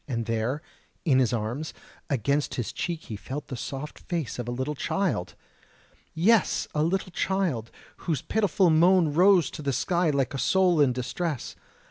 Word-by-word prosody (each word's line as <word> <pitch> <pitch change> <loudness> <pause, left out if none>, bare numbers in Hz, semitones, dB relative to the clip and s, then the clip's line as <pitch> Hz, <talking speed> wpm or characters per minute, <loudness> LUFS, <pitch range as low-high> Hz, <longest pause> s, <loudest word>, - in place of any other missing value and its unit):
and 115 -4 -2
there, 115 +7 -1 0.4
in 135 -5 +4
his 125 -4 +2
arms, 120 +7 -3 0.3
against 140 +2 0
his 120 - -3
cheek 170 -2 -3
he 110 - -6
felt 135 +8 -6
the 130 - -4
soft 135 +5 -6
face 165 -9 -4
of 120 - -4
a - - -2
little 130 +4 -2
child!... 170 - -1 0.8
Yes, 215 +6 +3
a 150 - +1
little 185 +4 0
child, 170 - -1 0.3
whose 160 -7 -2
pitiful 200 -4 +2
moan 170 -1 +4
rose 180 -1 +5
to - - -7
the 140 -1 -1
sky 170 +6 +1
like 140 -3 0
a 135 - -3
soul 180 -2 +3
in 140 -3 +4
distress. 130 +4 -3
150 Hz, 165 wpm, -27 LUFS, 125-175 Hz, 0.8 s, rose